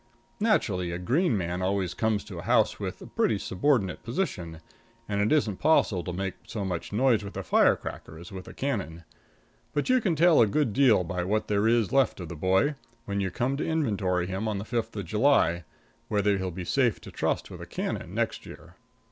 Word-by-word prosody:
Naturally, 105 - +1
a 85 - -3
green 125 - +1
man 90 0 -2
always 95 -1 0
comes 110 -2 0
to - - -8
a - - -5
house - - +2
in - - -3
a - - -2
pretty - - 0
subordinate 100 -1 0
position, 95 - -3 0.5
and 100 -1 0
it 105 - +1
isn't 115 -11 +2
possible 105 - +3
to 90 - -4
make 95 +2 -3
so 105 -3 -4
much 90 -3 -4
noise 115 0 +2
with 100 - -8
a - - -3
firecracker 80 - +1
as 85 +4 -11
with 95 -1 -8
a - - -9
cannon. 100 - -3 0.7
But 145 - -1
you 255 -1 +4
can 185 -7 +1
tell 165 -2 +5
a 110 - +5
good 130 +1 0
deal 120 -8 +4
by 90 +1 -3
what 105 +4 0
there 105 +1 +2
is 115 -3 +2
left 135 -5 +3
of 85 -3 -6
the 85 - -6
boy, 95 - +2 0.3
when 100 0 -2
you 95 -1 0
come 125 +8 -1
to - - -2
inventory 100 - 0
him 95 +4 -3
on 105 -2 -1
the 100 - -5
fifth 115 -1 -3
of 100 -3 -4
July, 90 - +2 0.4
whether 100 -1 +1
he'll 95 0 -2
be 90 +1 -6
safe 120 +5 +1
to - - -10
trust - - -2
with - - -9
a - - -8
cannon - - -4
next - - -1
year. - - -13
100 Hz, 210 wpm, -27 LUFS, 90-130 Hz, 0.7 s, tell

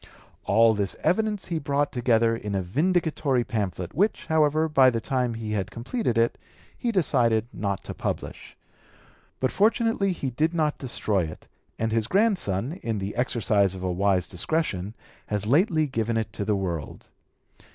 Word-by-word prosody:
All 115 +2 +5
this 100 -2 -1
evidence 210 0 0
he 165 -2 -1
brought 145 0 0
together 115 -2 +2
in 105 -3 -4
a 95 - 0
vindicatory 150 - +1
pamphlet, 95 -6 -3
which, 205 +5 +1
however, 155 0 +2
by 135 -4 +5
the 115 -2 -1
time 125 0 -1
he 110 -1 -5
had 100 -3 -1
completed 120 - -2
it 115 0 +2 0.4
he 240 - -1
decided 120 - +2
not 100 -2 -3
to - - -6
publish. - - -5 0.8
But 130 - 0
fortunately 220 -1 +2
he 140 -7 -3
did 155 +7 0
not 155 -2 0
destroy 105 -8 0
it, 80 - -10 0.3
and 115 0 -1
his 115 -1 +1
grandson, 180 - +1
in 115 -2 -2
the 100 +1 -4
exercise 110 -6 +1
of 95 - -7
a 90 - 0
wise 95 0 +1
discretion, 100 - -2 0.3
has 105 -1 -1
lately 155 - +3
given 115 -4 -1
it 110 -2 -3
to 100 - -3
the 105 - +1
world. 85 -6 -4
115 Hz, 160 wpm, -25 LUFS, 105-155 Hz, 0.8 s, All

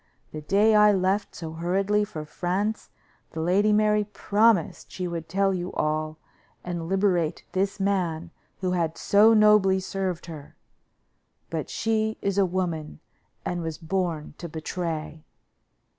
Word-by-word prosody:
The 155 - -6
day 205 +8 +3
I 210 0 +6
left 195 +2 0
so 160 -2 -6
hurriedly 195 +5 +1
for 160 -8 -7
France 190 +7 -2 0.4
the 160 - -5
Lady 190 +6 +2
Mary 210 0 +3
promised 205 -1 +1
she 180 -1 -4
would 165 -2 -5
tell 195 0 +1
you 180 0 -3
all 155 0 -1 0.5
and 175 -2 -4
liberate 185 -5 +1
this 195 +2 -1
man 175 -4 -1 0.3
who 185 -1 0
had 165 -3 -1
so 215 +3 +5
nobly 210 -3 +5
served 190 -2 -3
her; 155 -4 -10 1.0
but - - -3
she 220 -1 -1
is 200 0 -1
a 195 - +4
woman, 170 - -3 0.5
and 175 -1 -2
was 160 -2 -4
born 170 -3 -3
to 170 - -6
betray." 160 -1 -5
185 Hz, 140 wpm, -25 LUFS, 165-200 Hz, 1.0 s, I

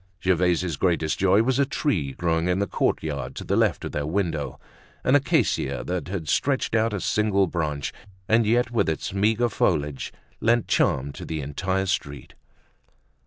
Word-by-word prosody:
Gervaise's 90 -3 +1
greatest 80 -3 0
joy 95 +3 +4
was 130 +2 +1
a 140 - +4
tree 95 - -1
growing 85 +1 0
in 90 0 +1
the 100 - +1
courtyard 70 -8 -2
to - - -6
the - - 0
left - - +1
of - - -5
their 75 0 -2
window, 80 -4 -2 0.4
an 130 - +2
acacia 145 - +1
that 90 0 -3
stretched 135 - 0
out 115 0 +2
a 100 - -2
single 100 0 +2
branch 75 -5 -3 0.3
and 115 0 +3
yet, 120 +2 +2
with 115 -8 +1
its 80 +3 -3
meager 110 +4 +2
foliage, 75 - -1 0.3
lent 115 0 +2
charm 70 +2 +1
to - - -9
the 80 -1 -4
entire 95 +7 -1
street. 70 -6 -3
90 Hz, 165 wpm, -25 LUFS, 80-110 Hz, 0.4 s, joy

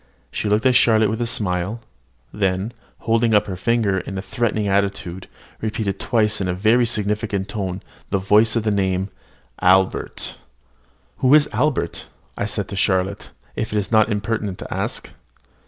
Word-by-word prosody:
She 105 - -2
looked 105 +4 +2
at 130 - +5
Charlotte 110 -4 +4
with 110 +2 -3
a 120 - 0
smile, 100 -1 -2 0.5
then, 95 +2 -1 0.3
holding 115 -1 +2
up 105 - +4
her 95 - -4
finger 105 -1 +1
in 95 +1 -6
a - - -2
threatening 110 -2 -1
attitude, 100 -2 -1 0.3
repeated 110 -3 -2
twice 105 -3 +1
in 95 - -1
a 90 - -1
very 115 +5 +3
significant 105 -2 -1
tone 95 -3 -4 0.3
of 95 -1 -1
voice 110 +2 +5
the 110 -2 +1
name 95 -2 +1
of 100 - -7 0.5
"Albert." 95 +1 +2 0.8
"Who 130 +2 +5
is 150 -1 +5
Albert," 140 - -1 0.4
said - - -2
I - - -20
to - - -5
Charlotte, 95 +1 0 0.3
"if 110 - -3
it - - +1
is 100 0 -2
not 110 -1 +4
impertinent 105 -1 -2
to - - -6
ask?" - - -3
105 Hz, 165 wpm, -21 LUFS, 95-115 Hz, 0.8 s, at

